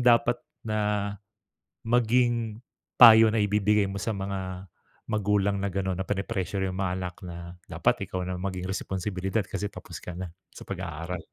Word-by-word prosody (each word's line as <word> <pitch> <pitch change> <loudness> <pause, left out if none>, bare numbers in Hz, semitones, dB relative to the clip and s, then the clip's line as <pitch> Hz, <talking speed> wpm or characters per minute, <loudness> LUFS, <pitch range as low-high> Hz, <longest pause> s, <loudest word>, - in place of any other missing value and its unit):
dapat 120 0 +4 0.2
na 105 -2 0 0.7
maging 120 -1 +2 0.3
payo 115 -2 +10
na 110 -1 +2
ibibigay 105 0 +3
mo 100 - -4
sa 110 +1 -2
mga 95 -2 -5 0.4
magulang 100 -1 +1
na 100 - -1
gano’n, 95 -1 -2
na 95 - -3
peni-pressure 100 -1 -2
yung 95 - -5
mga 95 -2 0
anak 90 -2 -4
na, 85 0 -7 0.2
"Dapat - - 0
ikaw 90 -1 -3
ng 90 0 -4
maging 95 -1 -3
responsibilidad 95 +1 -2
kasi 100 +2 -3
tapos - - -9
ka 90 - -7
na 90 -2 -5 0.2
sa - - -9
pag-aaral." 85 +2 -5
100 Hz, 155 wpm, -27 LUFS, 95-110 Hz, 0.7 s, payo